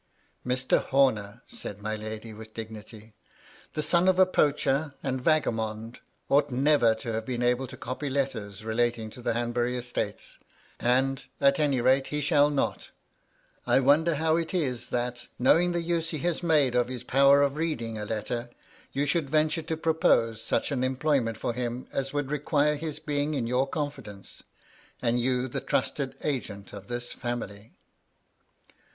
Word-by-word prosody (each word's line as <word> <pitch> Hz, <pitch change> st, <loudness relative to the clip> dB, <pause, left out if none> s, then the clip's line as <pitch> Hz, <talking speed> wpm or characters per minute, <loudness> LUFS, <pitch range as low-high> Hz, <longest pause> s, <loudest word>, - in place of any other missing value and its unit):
"Mr. 130 Hz, +1 st, +1 dB
Homer," 120 Hz, -5 st, +1 dB
said 215 Hz, -, -7 dB
my 110 Hz, +1 st, -3 dB
lady, 110 Hz, +1 st, -7 dB
with 110 Hz, 0 st, -12 dB
dignily, 110 Hz, -1 st, -9 dB, 0.6 s
"the 155 Hz, -, -2 dB
son 170 Hz, +4 st, +3 dB
of 185 Hz, -1 st, +4 dB
a 185 Hz, -, +7 dB
poacher 145 Hz, -4 st, +1 dB
and 130 Hz, -1 st, -2 dB
vagabond 115 Hz, -6 st, 0 dB, 0.3 s
ought 145 Hz, +1 st, +3 dB
never 130 Hz, -3 st, +3 dB
to 110 Hz, +1 st, -5 dB
have 110 Hz, 0 st, -2 dB
been 120 Hz, +1 st, -3 dB
able 125 Hz, +2 st, +1 dB
to -, -, -10 dB
copy 130 Hz, +4 st, -4 dB
letters 110 Hz, -7 st, -3 dB
relating 115 Hz, -1 st, 0 dB
to 125 Hz, -, -11 dB
the 115 Hz, -, 0 dB
Hanbury 120 Hz, +1 st, 0 dB
estates; 125 Hz, 0 st, -4 dB, 0.4 s
and, 130 Hz, +2 st, +1 dB
at 140 Hz, +1 st, +4 dB
any 140 Hz, -5 st, +2 dB
rate, 135 Hz, +2 st, +3 dB
he 150 Hz, -, -2 dB
shall 145 Hz, -1 st, +4 dB
not 145 Hz, -2 st, -1 dB, 0.8 s
I -, -, +5 dB
wonder 150 Hz, +5 st, +4 dB
how 160 Hz, +2 st, +2 dB
it 170 Hz, +2 st, -2 dB
is 130 Hz, -9 st, -1 dB
that, 120 Hz, 0 st, -3 dB
knowing 165 Hz, +8 st, +4 dB
the 170 Hz, -1 st, -1 dB
use 165 Hz, -1 st, -1 dB
he 160 Hz, -, -3 dB
has 175 Hz, -2 st, 0 dB
made 150 Hz, -7 st, +3 dB
of 125 Hz, -1 st, +2 dB
his 125 Hz, -1 st, -6 dB
power 140 Hz, +2 st, +5 dB
of 140 Hz, 0 st, +1 dB
reading 120 Hz, -9 st, -2 dB
a 105 Hz, -, -4 dB
letter, 115 Hz, +3 st, -3 dB, 0.4 s
you 140 Hz, +1 st, 0 dB
should 145 Hz, -1 st, 0 dB
venture 155 Hz, +2 st, +2 dB
to 160 Hz, 0 st, -3 dB
pro 160 Hz, 0 st, +1 dB
pose 115 Hz, -9 st, +2 dB
such -, -, -1 dB
an 130 Hz, -3 st, 0 dB
employment 130 Hz, -3 st, +1 dB
for 120 Hz, -, -2 dB
him 125 Hz, 0 st, -4 dB
as 135 Hz, 0 st, -2 dB
would 145 Hz, -1 st, -2 dB
require 150 Hz, 0 st, +2 dB
his 155 Hz, 0 st, -4 dB
being 145 Hz, +1 st, -1 dB
in 130 Hz, -4 st, -1 dB
your 125 Hz, +3 st, +1 dB
confidence, 135 Hz, -10 st, -6 dB, 0.6 s
and 120 Hz, 0 st, +1 dB
you 125 Hz, +1 st, +1 dB
the 120 Hz, -, -4 dB
trusted 135 Hz, -3 st, -1 dB
agent 110 Hz, -9 st, -4 dB
of 100 Hz, -1 st, -9 dB
this 120 Hz, 0 st, -4 dB
feunily. 115 Hz, -3 st, -5 dB
130 Hz, 170 wpm, -27 LUFS, 115-150 Hz, 0.8 s, a